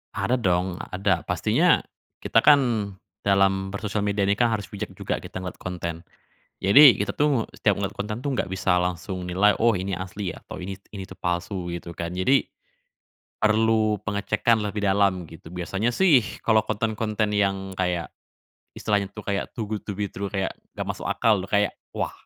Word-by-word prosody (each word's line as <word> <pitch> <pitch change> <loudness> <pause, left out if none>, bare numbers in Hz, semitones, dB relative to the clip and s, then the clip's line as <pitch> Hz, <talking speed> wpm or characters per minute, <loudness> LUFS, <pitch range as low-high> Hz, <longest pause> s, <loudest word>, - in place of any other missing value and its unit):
Ada 105 +5 0
dong 90 -3 0
ada. 95 -2 +1
Pastinya - - +3 0.4
kita 115 - +4
kan 120 -8 +4 0.3
dalam 95 0 +2
bersosial 105 0 -2
media 100 0 +1
ini 100 +1 +2
kan 120 - +5
harus 105 -5 -3
bijak - - -5
juga - - -3
kita 95 - -7
ngelihat 90 - -7
konten. 85 -2 -4 0.7
Jadi 115 +2 +8
kita 105 - -2
tuh 145 -6 +2
setiap 105 - +3
ngelihat 100 0 -3
konten 105 +3 -4
tuh 135 -1 -2
nggak - - +1
bisa 95 -1 +1
langsung 90 +1 -2
nilai, 95 +3 +3
"Oh, 115 0 +4
ini 95 -1 -2
asli," 95 +1 -5
atau, 90 - -9
"Ini 95 +1 -5 0.2
ini 95 - -5
itu 95 - -11
palsu," 90 0 -3
gitu 85 0 -6
kan. 85 +1 -4
Jadi 95 +10 +3 1.0
perlu 110 -1 +3
pengecekan 105 +2 +1
lebih 105 0 -3
dalam 95 -3 +2
gitu. 80 0 -13
Biasanya 95 +6 -1
sih 145 -4 +5 0.2
kalo 110 -1 +4
konten-konten 110 -1 -1
yang 95 -1 0
kayak 90 -2 -2 0.7
istilahnya 100 -2 0
tuh 105 0 -10
kayak 100 -1 -2
too 110 -3 -5
good 105 0 -4
to - - -5
be 105 - -1
true 100 +1 -5
kayak 95 -2 -1 0.2
nggak - - -3
masuk - - -9
akal 110 -3 +3
loh 95 - -7
kayak, 105 0 +2 0.2
wah, - - -1
100 Hz, 175 wpm, -25 LUFS, 95-110 Hz, 1.0 s, Jadi